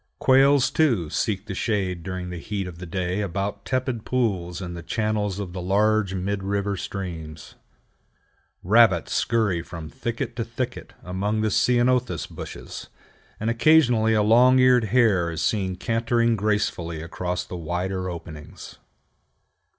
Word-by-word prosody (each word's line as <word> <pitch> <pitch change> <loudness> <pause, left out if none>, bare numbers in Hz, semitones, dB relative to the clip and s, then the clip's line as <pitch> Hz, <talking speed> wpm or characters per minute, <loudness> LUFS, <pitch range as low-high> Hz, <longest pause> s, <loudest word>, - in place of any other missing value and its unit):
Quails, 135 0 +4
too, 115 - +1
seek 100 -2 -1
the 100 - -5
shade 95 -4 -1
during 90 +1 -5
the 90 - -5
heat 100 +2 -4
of 90 -2 -9
the 90 - -7
day 90 +3 -2
about 100 +1 -3
tepid 130 -3 -2
pools 95 -9 -1
in 90 -2 -6
the 85 - -7
channels 105 +1 -1
of 100 -4 -5
the 90 - -5
larger 100 +1 +2
mid 95 +2 -2
river 100 +1 -1
streams. 85 -6 -7 1.1
Rabbits 100 -3 +4
scurry 110 -7 +1
from 80 -2 -9
thicket 115 0 -4
to 115 - 0
thicket 120 +2 -5
among 100 +4 -2
the 110 -1 0
ceanothus 125 +2 +2
bushes, - - -8 0.5
and 110 +2 0
occasionally 120 -4 +4
a 105 - +3
long 125 +4 +5
eared 125 -2 +5
hare 105 -6 +3
is 80 -1 -3
seen 95 +1 0
cantering 115 +3 +1
gracefully 100 -6 -1
across 90 +2 -3
the - - -8
wider 90 +2 -3
openings. 80 -3 -9
100 Hz, 145 wpm, -24 LUFS, 90-115 Hz, 1.1 s, long